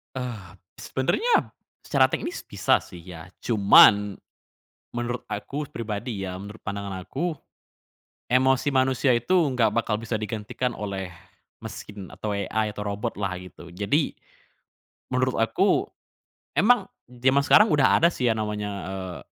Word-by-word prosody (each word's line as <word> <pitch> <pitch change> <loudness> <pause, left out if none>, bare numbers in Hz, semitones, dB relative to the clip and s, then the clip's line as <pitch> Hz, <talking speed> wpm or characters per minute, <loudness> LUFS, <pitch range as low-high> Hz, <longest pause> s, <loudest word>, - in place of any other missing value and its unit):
Eee, 115 -8 -6 0.2
sebenarnya 445 - +1 0.3
secara - - +3
teknis 345 - -4
bisa 100 -3 +2
sih 90 - -12
ya, 85 -2 -10 0.2
cuman, 105 -2 +6 0.8
menurut 120 +1 -3
aku 145 +2 -4
pribadi 110 -1 -4
ya, 90 - -5
menurut 100 +3 -10
pandangan 100 -2 -5
aku, 170 - -3 1.0
emosi 130 +2 +3
manusia 130 0 +3
itu 120 +9 0 0.2
enggak 115 -5 +1
bakal 115 -2 0
bisa 115 0 -3
digantikan 110 +3 -3
oleh 100 -4 -5 0.5
mesin 100 -3 -8
atau 105 -1 -4
AI 105 +2 -1
atau 105 - -4
robot 105 +3 -3
lah 100 -2 -2
gitu. 90 -1 -12
Jadi, 105 - 0 1.0
menurut 130 0 +1
aku 115 - +2 0.7
emang 235 +9 +4 0.2
jaman 130 +3 +2
sekarang 210 +8 +7
udah 145 -3 +5
ada 170 - +6
sih 125 -2 0
yang 110 - +1
namanya, 105 -1 -3 0.2
eee, 95 -3 -6
110 Hz, 130 wpm, -25 LUFS, 100-130 Hz, 1.0 s, sekarang